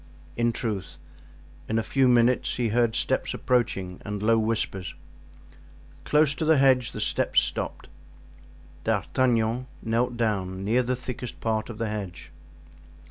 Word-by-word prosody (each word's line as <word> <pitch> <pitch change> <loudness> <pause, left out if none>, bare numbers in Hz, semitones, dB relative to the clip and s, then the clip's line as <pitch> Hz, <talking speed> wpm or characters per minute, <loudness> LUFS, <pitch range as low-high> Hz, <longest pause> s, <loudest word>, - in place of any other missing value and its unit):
In 120 0 +2
truth, 100 -8 -4 0.7
in 110 - +1
a 115 - +1
few 135 +2 +2
minutes 120 0 +3
he 120 -2 0
heard 115 0 +2
steps - - 0
approaching 95 -7 -1
and 105 0 -4
low 115 +1 +4
whispers. 110 -4 -2 1.1
Close 150 -1 +4
to 145 - -4
the 155 -1 +4
hedge 130 -3 +4
the - - -7
steps - - +2
stopped. - - -4 1.0
D'Artagnan 120 0 +1 0.2
knelt 120 +2 0
down 95 -4 -1
near 115 +5 +3
the 125 +1 -1
thickest 125 -1 -7
part 110 0 -1
of 115 - -7
the 115 0 -2
hedge. 100 -7 -6
115 Hz, 135 wpm, -26 LUFS, 105-125 Hz, 1.1 s, low